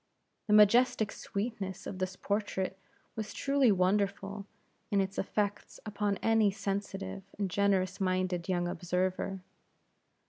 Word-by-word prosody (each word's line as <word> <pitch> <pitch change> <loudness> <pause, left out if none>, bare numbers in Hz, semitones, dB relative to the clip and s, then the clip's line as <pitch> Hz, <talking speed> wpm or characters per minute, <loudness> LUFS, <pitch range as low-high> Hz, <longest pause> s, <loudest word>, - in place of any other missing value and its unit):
The 210 - +2
majestic 220 +1 +5
sweetness 200 -3 -4
of 190 - -6
this 185 0 -2
portrait 195 -2 -2 0.4
was 215 -1 -5
truly 275 -4 +3
wonderful 200 +1 0 0.4
in 200 - +2
its 195 0 -1
effects 205 +1 -2
upon 205 -1 -1
any 225 -2 +4
sensitive 195 0 -4 0.2
and 200 -3 -1
generous 195 -2 +1
minded 185 -1 0
young 175 -1 +1
observer. 180 +2 -2
200 Hz, 115 wpm, -31 LUFS, 185-210 Hz, 0.4 s, majestic